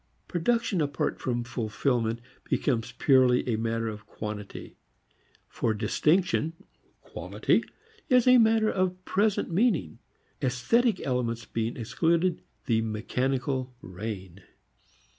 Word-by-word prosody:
Production 205 +1 0
apart 140 -3 -1
from 120 -2 -1
fulfilment 115 0 -1 0.2
becomes 125 -3 0
purely 125 0 +4
a 120 - +1
matter 115 +1 -1
of 110 -1 -7
quantity; 105 -2 -7 0.7
for 110 - -1
distinction, 155 - +1 0.5
quality, - - 0 0.5
is 250 -3 +5
a 250 -1 +7
matter 220 -1 +4
of 185 -1 -1
present 205 -2 +1
meaning. 170 - +1 0.4
Esthetic 185 - +2
elements 120 -3 -1
being 115 +1 -3
excluded, 165 +9 +1 0.2
the 115 -3 +2
mechanical 125 +4 -2
reign. 95 -2 -7
125 Hz, 105 wpm, -28 LUFS, 115-180 Hz, 0.7 s, a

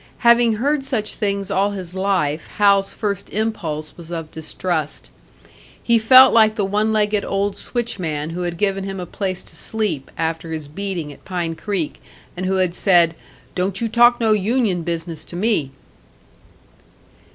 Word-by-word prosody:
Having 235 -1 +6
heard 280 +5 0
such 220 -6 -1
things 200 -2 -2
all 200 +2 +1
his 180 -3 -6
life, 185 -6 -1
Hal's 200 -2 +4
first 200 -3 -3
impulse 170 -9 -3
was 170 -2 -11
of 165 -2 -5
distrust. 160 -1 -4 0.7
He 235 -1 +4
felt 255 +4 +8
like 220 -1 +5
the 205 -3 0
one 210 +3 0
legged 210 -1 +1
old 200 0 -1
switchman 170 -11 -3
who 175 +2 -4
had 175 -1 -3
given 195 0 0
him 195 -1 -5
a 180 - -4
place 185 -1 -3
to - - -7
sleep, 205 -11 -2
after 165 0 -2
his 155 -2 -5
beating 170 -2 -5
at - - -19
Pine 175 -3 -3
Creek, 180 -2 -3 0.3
and 185 +1 -3
who 190 - +1
had 185 -2 +1
said, 175 -3 +4 0.4
"Don't 190 +1 -1
you 230 - -1
talk 240 +2 +5
no 225 -2 +2
union 210 -2 +1
business 165 -1 -4
to - - -10
me!" 190 -7 +1
195 Hz, 165 wpm, -20 LUFS, 170-215 Hz, 0.7 s, felt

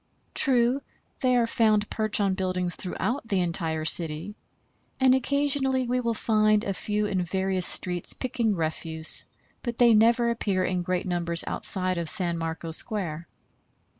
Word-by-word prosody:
True, 255 0 +1 0.4
they 255 -2 +2
are 240 -1 +3
found 215 -2 +1
perched 215 -1 -1
on 200 -2 +1
buildings 185 -2 -2
throughout 225 +7 -4
the 195 -4 0
entire 165 -2 -2
city, 165 +4 +1 0.6
and 260 -1 +4
occasionally 270 -1 0
we 250 +1 0
will 235 -2 -2
find 215 -1 +2
a 195 - -2
few 210 +3 -2
in 195 -3 -1
various 190 0 0
streets 180 -2 0
picking 235 -4 -2
refuse, 160 -1 +2 0.4
but 240 -2 -5
they 240 -2 +5
never 235 +2 +3
appear 200 -5 -1
in 180 -1 -1
great 180 +1 -2
numbers 170 -2 +1
outside 185 -2 +1
of 165 -2 -2
San 175 -4 0
Marco 165 0 -5
Square. 170 -4 0
200 Hz, 150 wpm, -25 LUFS, 175-235 Hz, 0.6 s, they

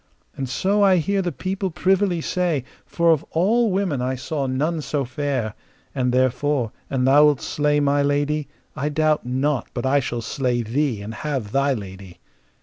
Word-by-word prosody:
And 135 -2 -4
so 200 +9 +1
I 195 -2 +5
hear 195 +4 +1
the 180 -2 -2
people 190 +4 -3
privily 185 0 +1
say, 170 -6 0 0.2
for 170 -1 +2
of 160 -1 +2
all 220 +8 +2
women 185 -9 0
I 130 +1 -1
saw 135 +2 -3
none 155 +5 -1
so 145 -2 -2
fair; 130 -5 -2 0.4
and 125 -2 0
therefore, 130 -1 +1 0.2
an 130 -2 0
thou 145 +3 +6
wilt 145 -3 +3
slay 150 0 +1
my 145 0 +2
lady, 145 +1 0 0.3
I 150 - -1
doubt 155 -2 +1
not 130 +2 0
but 120 - -2
I 140 +2 +3
shall 120 -3 -3
slay 120 0 -1
thee 120 -2 -1
and 110 +2 -6
have 135 -7 -3
thy 140 +1 +2
lady. 95 -3 -9
145 Hz, 175 wpm, -22 LUFS, 130-160 Hz, 0.4 s, thou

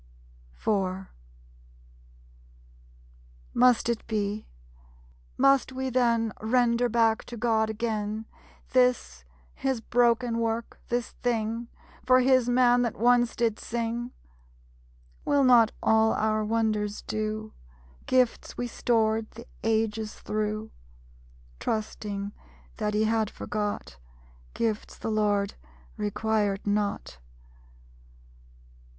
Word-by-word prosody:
_ - - -17 0.3
IV 190 - -15 2.4
Must 250 -1 +4
it 235 -2 -2
be? 210 -1 -2 0.9
Must 275 -1 +4
we 260 0 -3
then 230 -3 +2
Render 240 +1 +2
back 225 0 +2
to 240 - -8
God 220 -1 +1
again 220 -1 -2 0.5
This 250 - +2 0.3
His 265 -3 -1
broken 235 0 +2
work, 230 0 -2
this 240 0 -2
thing, 230 -1 -1 0.4
For 255 0 +5
His 255 -1 +3
man 245 0 +4
that 235 -3 -1
once 240 +1 +3
did 230 -2 0
sing? 235 +1 -3 1.1
Will 285 -1 +3
not 240 -4 +6
all 220 0 +4
our 215 0 +1
wonders 215 -1 -1
do? 215 0 -3 0.5
Gifts 255 -2 +1
we 245 - -2
stored 225 -2 +1
the 230 +2 -12 0.2
ages 220 -1 0
through, 215 +1 -3 0.9
(Trusting 205 -2 -3 0.5
that 210 -1 -1
He 215 - +3
had 220 -1 +1
forgot) 205 - -4 0.6
Gifts 225 -2 -2
the 225 - -3
Lord 205 -2 +1 0.5
requirèd 210 -1 0
not? 205 - -1
225 Hz, 100 wpm, -27 LUFS, 215-240 Hz, 2.4 s, not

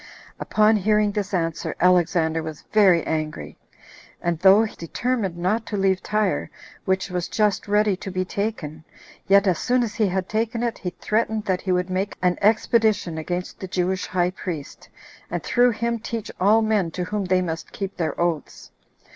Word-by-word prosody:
Upon 215 +1 +3
hearing 210 +1 +2
this 205 -1 -3
answer, 165 -4 -2
Alexander 175 -2 +3
was 160 -1 -7
very 190 -6 +5
angry; 155 -1 -3 0.6
and 170 -2 -1
though 195 +4 +6
he 220 - -5
determined 205 +1 -2
not 195 +6 0
to 210 - -3
leave 190 -1 +2
Tyre, 210 -2 0 0.4
which 190 0 0
was 180 -1 -2
just 210 -2 0
ready 210 -1 +2
to 195 - -7
be 185 0 -2
taken, 180 -7 -4 0.4
yet 200 +1 +5
as 185 -4 +2
soon 250 0 +2
as 225 -2 -3
he 215 -3 +1
had 190 0 -2
taken 225 +2 -1
it, 235 -1 -2
he 180 - -3
threatened 215 +3 -1
that 185 -3 0
he 190 - -2
would 180 0 0
make 190 +2 -2
an 180 -1 +1
expedition 215 -5 +2
against 175 +3 -4
the 190 - -6
Jewish 185 +1 -1
high 180 -1 0
priest, 170 -6 -7 0.4
and - - -3
through 245 0 +3
him 235 +1 -1
teach 230 -1 -5
all 210 +4 +4
men 215 -5 +1
to 180 +2 -4
whom 205 +2 -2
they 185 0 +2
must 165 -1 -5
keep 195 -1 -5
their 165 -4 -2
oaths. 170 -3 -2
190 Hz, 180 wpm, -23 LUFS, 180-215 Hz, 0.6 s, though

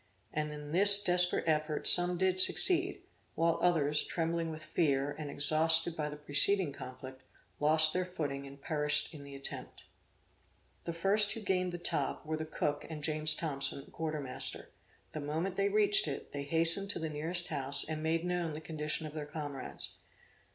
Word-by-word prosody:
And 150 0 -3
in 150 0 -9
this 200 +3 +6
desperate 180 0 +2
effort 155 -1 -2
some 175 0 +7
did 185 0 0
succeed, 360 - +4 0.3
while 165 0 0
others, 150 -4 +1
trembling 165 0 -3
with 155 -1 -9
fear, 140 -4 -1
and 145 0 -8
exhausted 160 +3 +2
by 150 -2 -4
the 150 - -8
preceding 150 +3 0
conflict, 130 0 -11 0.4
lost 155 +1 +4
their 185 - -1
footing 145 -6 -6
and 140 +1 -14
perished 150 +1 -1
in 145 -2 -11
the 140 0 -12
attempt. 135 - -9 1.0
The 170 - -4
first 200 +5 +3
who 225 - -8
gained 185 -2 -2
the 175 - -6
top, 175 - -3
were 155 +1 -3
the 155 0 -6
cook 145 -1 -3
and 155 -2 -8
James 155 0 +5
Thompson, 140 -3 0
a - - -19
quarter 155 -2 -5
master; 130 -2 0 0.4
the 155 - -7
moment 160 +6 -4
they 200 +1 0
reached 205 -3 +5
it, 140 - -7
they 140 0 -6
hastened 165 +6 +1
to - - +2
the 160 - -4
nearest 165 +4 0
house 140 -2 +1
and 155 0 -5
made 165 +2 -2
known 175 -3 -3
the 150 - -7
condition 155 0 -5
of 150 - -9
their 150 -2 -7
comrades. 145 -3 -6
155 Hz, 180 wpm, -31 LUFS, 150-175 Hz, 1.0 s, some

